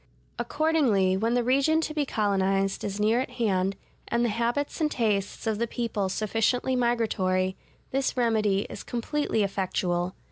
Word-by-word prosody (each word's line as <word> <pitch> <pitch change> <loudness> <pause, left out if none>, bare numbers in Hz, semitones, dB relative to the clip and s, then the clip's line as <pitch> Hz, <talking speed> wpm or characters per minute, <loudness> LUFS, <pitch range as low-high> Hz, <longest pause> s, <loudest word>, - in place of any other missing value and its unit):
Accordingly, 275 -12 +2
when 225 +5 +1
the 245 - +2
region 275 +6 +3
to 310 - -3
be 295 -2 -1
colonized 195 -2 0
is 200 0 -3
near 220 +3 +3
at 265 - -4
hand, 195 -6 0 0.3
and 235 0 +1
the - - +1
habits 235 +8 -1
and 305 - +3
tastes 210 -7 -1
of 220 -1 0
the 235 - 0
people 220 -5 -2
sufficiently 225 +6 0
migratory, 195 -6 +1 0.4
this 270 0 0
remedy 215 -5 +2
is - - -8
completely 240 -1 -1
effectual. 185 -2 -1
225 Hz, 150 wpm, -27 LUFS, 195-250 Hz, 0.4 s, region